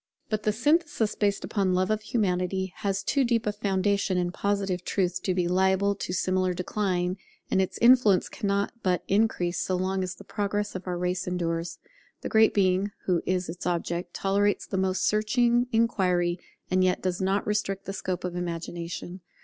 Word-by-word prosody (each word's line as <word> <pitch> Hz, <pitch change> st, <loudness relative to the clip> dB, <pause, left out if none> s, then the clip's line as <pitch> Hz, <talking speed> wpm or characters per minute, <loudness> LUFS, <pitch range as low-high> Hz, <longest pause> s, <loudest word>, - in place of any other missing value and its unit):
But 215 Hz, -1 st, 0 dB
the 215 Hz, -, +1 dB
synthesis 290 Hz, -2 st, +1 dB
based 200 Hz, -1 st, 0 dB
upon 190 Hz, -3 st, 0 dB
Love 185 Hz, +3 st, +1 dB
of 215 Hz, 0 st, 0 dB
Humanity 190 Hz, -4 st, -1 dB
has 195 Hz, -1 st, -1 dB
too 280 Hz, -, +2 dB
deep 235 Hz, -2 st, +1 dB
a 210 Hz, -, +1 dB
foundation 200 Hz, -1 st, 0 dB
in 175 Hz, -1 st, 0 dB
Positive 195 Hz, -2 st, -1 dB
truth 180 Hz, -2 st, -1 dB
to 185 Hz, -, -1 dB
be 180 Hz, -2 st, +1 dB
liable 190 Hz, +2 st, +2 dB
to 190 Hz, -, -5 dB
similar 185 Hz, 0 st, 0 dB
decline; 180 Hz, -1 st, -1 dB, 0.3 s
and 190 Hz, -, +3 dB
its 190 Hz, -, -2 dB
influence 235 Hz, -6 st, +6 dB
cannot 200 Hz, 0 st, -1 dB
but 180 Hz, -2 st, 0 dB
increase 195 Hz, -4 st, +1 dB
so 185 Hz, -, -1 dB
long 190 Hz, +1 st, -1 dB
as 185 Hz, -1 st, -3 dB
the -, -, -13 dB
progress 205 Hz, 0 st, -2 dB
of 185 Hz, 0 st, -7 dB
our 180 Hz, -1 st, -2 dB
race 180 Hz, +1 st, -2 dB
endures. 170 Hz, -1 st, -2 dB, 0.4 s
The -, -, -4 dB
Great 220 Hz, 0 st, +5 dB
Being, 190 Hz, 0 st, +2 dB, 0.2 s
who 180 Hz, -3 st, +2 dB
is 185 Hz, -1 st, 0 dB
its 175 Hz, +2 st, -5 dB
object, 175 Hz, 0 st, -2 dB
tolerates 200 Hz, +1 st, +1 dB
the -, -, -5 dB
most 190 Hz, 0 st, +1 dB
searching 240 Hz, +3 st, +2 dB
inquiry, 180 Hz, -6 st, +1 dB, 0.3 s
and 185 Hz, 0 st, +3 dB
yet 185 Hz, -1 st, +1 dB
does 185 Hz, 0 st, -1 dB
not 195 Hz, +2 st, +1 dB
restrict 205 Hz, -2 st, -1 dB
the 195 Hz, -, -4 dB
scope 185 Hz, -2 st, -3 dB
of 180 Hz, -1 st, -3 dB
Imagination. 175 Hz, +1 st, -5 dB
190 Hz, 180 wpm, -27 LUFS, 180-205 Hz, 0.4 s, influence